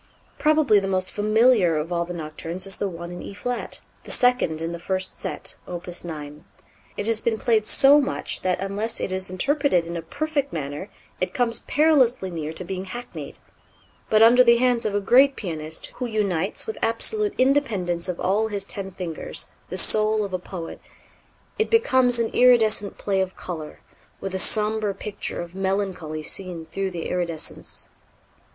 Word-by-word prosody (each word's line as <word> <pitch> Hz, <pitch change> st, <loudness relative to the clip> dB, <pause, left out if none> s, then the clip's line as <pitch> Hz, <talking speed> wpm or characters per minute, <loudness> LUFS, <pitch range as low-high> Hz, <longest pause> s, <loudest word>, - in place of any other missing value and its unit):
Probably 300 Hz, -8 st, +4 dB
the 195 Hz, -, -3 dB
most 185 Hz, -1 st, -1 dB
familiar 215 Hz, -4 st, +3 dB
of 160 Hz, +4 st, -3 dB
all 170 Hz, 0 st, 0 dB
the 175 Hz, -, -6 dB
Nocturnes 165 Hz, +3 st, -6 dB
is 195 Hz, -1 st, -4 dB
the 200 Hz, -, -1 dB
one 170 Hz, 0 st, -8 dB
in 175 Hz, -, -7 dB
E 200 Hz, -, -8 dB
flat, 245 Hz, +4 st, -4 dB, 0.2 s
the -, -, -13 dB
second 245 Hz, -11 st, +2 dB
in 165 Hz, +1 st, -3 dB
the 170 Hz, -, -6 dB
first 185 Hz, +1 st, -2 dB
set, -, -, -4 dB
Opus 175 Hz, 0 st, -5 dB
9. 150 Hz, -3 st, -8 dB, 0.5 s
It 205 Hz, -, -2 dB
has 225 Hz, -1 st, +2 dB
been 225 Hz, -2 st, 0 dB
played 220 Hz, -2 st, +1 dB
so 285 Hz, +2 st, +7 dB
much 280 Hz, 0 st, -3 dB
that 185 Hz, -1 st, 0 dB
unless 200 Hz, +4 st, -3 dB
it -, -, -3 dB
is 185 Hz, 0 st, -3 dB
interpreted 265 Hz, -, +1 dB
in 170 Hz, +1 st, -6 dB
a 170 Hz, -, -3 dB
perfect 285 Hz, -, -2 dB
manner 150 Hz, +4 st, -5 dB, 0.3 s
it 185 Hz, 0 st, -2 dB
comes 240 Hz, -2 st, +1 dB
perilously 265 Hz, -, +2 dB
near 155 Hz, -2 st, -4 dB
to 160 Hz, -, -6 dB
being 185 Hz, +1 st, -5 dB
hackneyed; 240 Hz, +6 st, -8 dB, 0.7 s
but 215 Hz, 0 st, +5 dB
under 245 Hz, +2 st, +7 dB
the 235 Hz, -1 st, +6 dB
hands 245 Hz, -1 st, +2 dB
of 205 Hz, -, -2 dB
a -, -, +3 dB
great 265 Hz, +7 st, +5 dB
pianist, 160 Hz, -4 st, -5 dB
who 250 Hz, -, -2 dB
unites 200 Hz, -5 st, -1 dB
with 445 Hz, -, -5 dB
absolute 415 Hz, -, +2 dB
independence 210 Hz, -11 st, +1 dB
of 180 Hz, -, -3 dB
all 205 Hz, +4 st, +1 dB
his 200 Hz, -2 st, -3 dB
ten 195 Hz, -3 st, -4 dB
fingers, 180 Hz, -4 st, -5 dB, 0.2 s
the -, -, -5 dB
soul 215 Hz, 0 st, +2 dB
of 195 Hz, -, -8 dB
a 185 Hz, -, -1 dB
poet, 175 Hz, -2 st, -8 dB, 0.8 s
it 440 Hz, -, +1 dB
becomes 260 Hz, -, +4 dB
an 230 Hz, -1 st, +1 dB
iridescent 225 Hz, -5 st, +4 dB
play 195 Hz, -2 st, 0 dB
of 190 Hz, 0 st, -3 dB
color, 160 Hz, -4 st, -7 dB, 0.4 s
with 195 Hz, -1 st, -5 dB
a 190 Hz, -, 0 dB
sombre 215 Hz, 0 st, +4 dB
picture 200 Hz, -2 st, -4 dB
of 175 Hz, 0 st, -8 dB
melancholy 190 Hz, -5 st, -2 dB
seen 180 Hz, -2 st, -5 dB
through 195 Hz, +4 st, -3 dB
the 170 Hz, -3 st, -5 dB
iridescence. 170 Hz, -3 st, -3 dB
195 Hz, 175 wpm, -24 LUFS, 175-235 Hz, 0.8 s, so